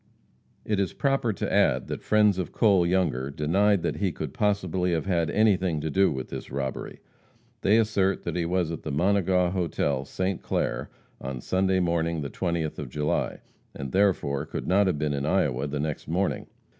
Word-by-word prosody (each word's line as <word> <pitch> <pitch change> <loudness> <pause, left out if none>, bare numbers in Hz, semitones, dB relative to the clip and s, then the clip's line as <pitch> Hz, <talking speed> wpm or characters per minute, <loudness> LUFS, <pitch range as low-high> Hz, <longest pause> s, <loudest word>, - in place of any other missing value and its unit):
It 105 -2 0
is 95 -4 0
proper 135 -4 +1
to 95 - -3
add - - +3
that - - -5
friends 105 -3 +3
of 90 - -3
Cole 95 -6 +3
Younger 85 -8 0
denied 90 +7 +2
that - - -1
he 95 -3 0
could - - -6
possibly 95 -6 0
have 80 - -1
had 85 -5 +1
anything 95 -6 +2
to 80 +1 -3
do 95 +5 +3
with 65 -2 -5
this - - -7
robbery. 65 0 -4 0.6
They 105 +3 +4
assert 100 -4 +1
that 85 - -3
he 90 - 0
was 85 -1 0
at 80 - -5
the 75 - -5
Monegaw 90 +2 +2
hotel, 75 -7 -1
St. 95 +5 -2
Clair, - - -2 0.3
on 65 -1 -5
Sunday 95 +6 +1
morning, 85 -2 0
the 70 - -5
20th 85 -4 -2
of 70 - -5
July, 75 +3 -1 0.3
and 70 -1 -5
therefore 80 -8 +1
could - - -5
not 95 +2 +3
have 90 - +1
been 75 0 -1
in 70 +1 -2
Iowa 75 -7 +1
the 75 0 -3
next 75 0 -3
morning. 90 +5 -1
90 Hz, 185 wpm, -26 LUFS, 75-95 Hz, 0.6 s, They